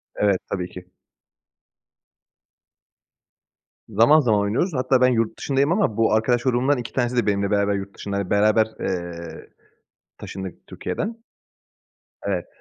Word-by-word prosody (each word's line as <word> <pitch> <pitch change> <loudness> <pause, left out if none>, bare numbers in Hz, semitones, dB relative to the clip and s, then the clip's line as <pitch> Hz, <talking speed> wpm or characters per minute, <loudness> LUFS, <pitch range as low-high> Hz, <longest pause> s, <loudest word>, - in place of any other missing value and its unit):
Evet, 100 -2 +2
tabii 90 -2 -3
ki. 90 0 -12 3.0
Zaman 115 +9 +5
zaman 110 -6 +2
oynuyoruz. 110 - 0
Hatta 130 -1 +2
ben 125 - +6
yurt 115 -3 0
dışındayım 140 +2 +1
ama 175 - +1
bu 115 -1 +3
arkadaş 120 +2 +2
grubumdan 130 +2 +2
2 120 -1 -6
tanesi 125 -1 0
de 120 - +2
benimle 100 -1 0
beraber 100 0 +2
yurt 100 0 -5
dışında, 100 -1 -4
hani, 100 -2 -3
beraber, 110 +2 +3
eee, 85 -2 -5 0.7
taşındık 95 -2 -8
Türkiye'den. 225 +2 -5 1.0
Evet. - - -2
110 Hz, 130 wpm, -23 LUFS, 100-125 Hz, 3.0 s, ben